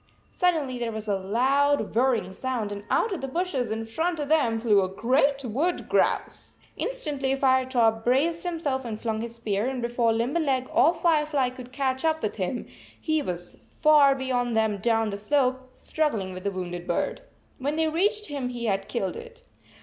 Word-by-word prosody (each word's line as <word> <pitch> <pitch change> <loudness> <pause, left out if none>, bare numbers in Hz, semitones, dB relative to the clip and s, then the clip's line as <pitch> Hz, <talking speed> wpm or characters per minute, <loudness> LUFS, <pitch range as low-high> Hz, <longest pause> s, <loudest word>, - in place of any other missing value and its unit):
Suddenly 310 -9 0
there 235 -1 -2
was 220 0 -6
a 205 - +1
loud 255 +6 +1
whirring 230 -6 +1
sound, 240 -3 -3
and 205 0 -6
out 450 - +2
of 370 - -4
the 270 - -3
bushes 270 - -2
in 220 +1 -3
front 325 +9 -2
of 290 -1 -3
them 250 -8 +2
flew 215 -3 +4
a 185 - -1
great 270 +7 +1
wood 290 +11 -1
grouse! - - 0 0.2
Instantly 285 - -1
Firetop 255 -4 +2
braced 300 +8 +1
himself 320 -7 -2
and 220 -3 -5
flung 220 -1 -2
his 235 0 -5
spear, 215 -1 -1
and 265 -1 -2
before 235 -1 +1
Limberleg 260 +3 0
or 330 +5 +4
Firefly 300 -6 +1
could 250 -1 -11
catch 265 0 -1
up 315 -1 +1
with 215 - -2
him, 195 +5 -2 0.3
he 315 -1 0
was 175 -7 -5
far 300 -3 +4
56 265 -1 -5
beyond 245 -2 0
them 220 -2 +2
down 225 0 +1
the 200 - -4
slope, 260 +2 0
struggling 225 -15 -2
with 185 +1 -9
the - - +2
wounded 175 -2 -5
bird. - - -1 0.4
When 285 +3 -1
they 320 0 +1
reached 410 +7 +1
him, 280 -6 -3
he 240 -1 -5
had 195 -2 -1
killed 190 - -2
it. 475 +1 -11
255 Hz, 185 wpm, -26 LUFS, 225-295 Hz, 0.4 s, flew